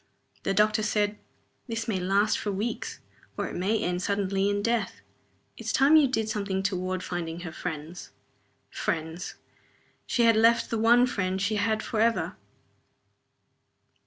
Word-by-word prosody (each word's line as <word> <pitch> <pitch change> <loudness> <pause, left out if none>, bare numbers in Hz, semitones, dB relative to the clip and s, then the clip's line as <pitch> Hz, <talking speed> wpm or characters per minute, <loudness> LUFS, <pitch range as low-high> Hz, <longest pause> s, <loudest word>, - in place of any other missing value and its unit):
The 195 - -1
doctor 215 +1 +3
said, 210 0 0 0.5
"This 225 -2 -3
may 205 -5 0
last 200 +4 +2
for 205 - -2
weeks. 210 +5 -4 0.4
Or - - -1
it - - -7
may 195 +5 +1
end 180 0 -1
suddenly 200 0 0
in 205 0 -1
death. 235 0 -1 0.6
It's - - -3
time 280 +4 +5
you 305 -3 +7
did 225 -4 -1
something 200 -3 -2
toward 185 -1 -2
finding 170 -1 -4
her 170 -2 -6
friends." 160 +1 -6 0.6
(Her - - -20
friends! 160 +2 -3 0.7
She 240 - +2
had 230 -1 +5
left 230 +1 +4
the 230 - 0
one 240 +2 +5
friend 190 -6 -1
she 210 +2 0
had 220 +1 0
forever!) 230 0 0
205 Hz, 150 wpm, -27 LUFS, 185-225 Hz, 0.7 s, you